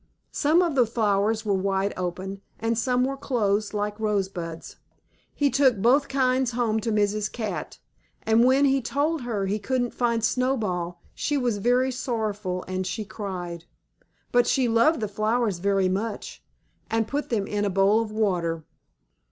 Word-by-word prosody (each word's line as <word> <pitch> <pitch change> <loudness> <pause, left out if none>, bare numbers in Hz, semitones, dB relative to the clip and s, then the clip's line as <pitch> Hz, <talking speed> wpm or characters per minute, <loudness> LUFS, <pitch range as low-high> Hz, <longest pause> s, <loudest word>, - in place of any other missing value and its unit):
Some 320 +5 +3
of 335 -3 0
the 250 -4 +3
flowers 215 -1 +1
were 205 - +1
wide 195 +1 0
open, 185 +2 -4 0.2
and 225 +1 0
some 250 +2 +1
were 270 +1 -1
closed, 215 -6 0
like 210 0 -3
rosebuds. 190 -6 -3 0.6
He 285 -2 +2
took 260 -3 +4
both 255 +8 +3
kinds 255 -2 +1
home 230 -2 +1
to 225 +1 -2
Mrs. 210 0 0
Cat, 220 -3 -4 0.5
and 225 +1 +4
when 265 +3 +4
he 270 -1 +3
told 290 +5 -1
her 220 -5 -2
he 205 +2 -1
couldn't 245 +3 -1
find 235 -2 0
Snowball 210 -9 -1
she 290 - -1
was 240 -6 0
very 250 +4 +2
sorrowful 210 -7 -3
and 185 0 -2
she 210 +3 -3
cried. 180 -5 -6 0.7
But 245 0 +4
she 260 -2 +2
loved 230 +5 +3
the 215 - 0
flowers 215 -1 0
very 195 0 +2
much, 205 +4 -4 0.5
and 225 -1 0
put 285 +5 -3
them 210 -4 0
in 205 0 -2
a 205 - +1
bowl 195 +3 +3
of 225 - -4
water. 175 -7 0
220 Hz, 160 wpm, -25 LUFS, 195-250 Hz, 0.7 s, took